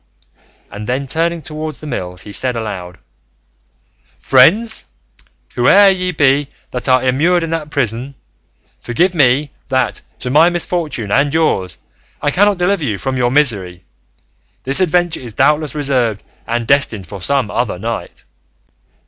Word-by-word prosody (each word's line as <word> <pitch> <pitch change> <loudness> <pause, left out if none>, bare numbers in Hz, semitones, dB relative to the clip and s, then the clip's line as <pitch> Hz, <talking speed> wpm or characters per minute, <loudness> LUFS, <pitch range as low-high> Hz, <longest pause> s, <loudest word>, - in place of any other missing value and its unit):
And 105 +1 -7
then 130 +3 -1
turning 165 +3 -1
towards 155 +1 -6
the - - -10
mills 90 -10 -5
he 105 - -10
said 125 +4 0
aloud, 95 -6 -5 1.2
"Friends, 205 - +3 0.7
whoe'er 205 -1 +6
ye 185 -1 -1
be 145 -2 +2 0.2
that 125 +1 -3
are 130 0 +4
immured 165 +7 +2
in 165 - -4
that 160 -2 -3
prison, 130 0 -2 0.6
forgive 175 +10 0
me 145 -1 +2 0.2
that, 130 -1 0 0.2
to 125 - -5
my 160 +5 +5
misfortune 170 - -3
and 140 +5 +2
yours, 140 - 0 0.4
I 145 - 0
cannot 205 +4 +3
deliver 180 0 0
you 110 -8 -1
from 130 +5 -3
your 125 -1 +1
misery; 100 -11 0 0.8
this 135 +1 +1
adventure 175 -2 +1
is 120 -4 -9
doubtless 150 0 +2
reserved 130 -7 0 0.2
and 120 0 -1
destined 115 -7 +1
for 100 +2 -9
some 135 -1 0
other 120 -7 -1
knight." 115 +5 -6
135 Hz, 140 wpm, -16 LUFS, 115-160 Hz, 1.2 s, whoe'er